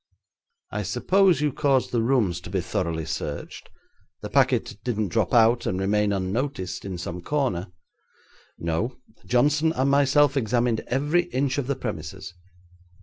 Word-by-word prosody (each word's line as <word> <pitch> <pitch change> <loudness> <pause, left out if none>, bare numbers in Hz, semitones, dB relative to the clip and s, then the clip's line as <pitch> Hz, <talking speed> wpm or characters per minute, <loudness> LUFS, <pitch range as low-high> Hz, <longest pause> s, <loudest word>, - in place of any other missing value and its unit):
'I - - -2
suppose 190 -4 +2
you 150 -3 +1
caused 135 -3 +1
the 120 - +1
rooms 110 -8 +1
to - - -9
be 95 +1 -1
thoroughly 85 -2 -2
searched. 75 -1 -5 0.5
The - - -6
packet - - +2
didn't 110 -5 -1
drop - - 0
out 120 -1 +4
and 95 - -1
remain 105 +2 +1
unnoticed 100 +3 -2
in 95 -2 -4
some 90 0 -5
corner?' 125 -7 -1 0.9
'No; 85 +10 -2 0.3
Johnson 145 +6 +3
and 135 -2 +1
myself 145 0 +4
examined 120 -2 +1
every 145 +7 +1
inch 135 -3 -1
of 130 - -3
the 140 - 0
premises.' 95 - -6
120 Hz, 145 wpm, -25 LUFS, 95-140 Hz, 0.9 s, out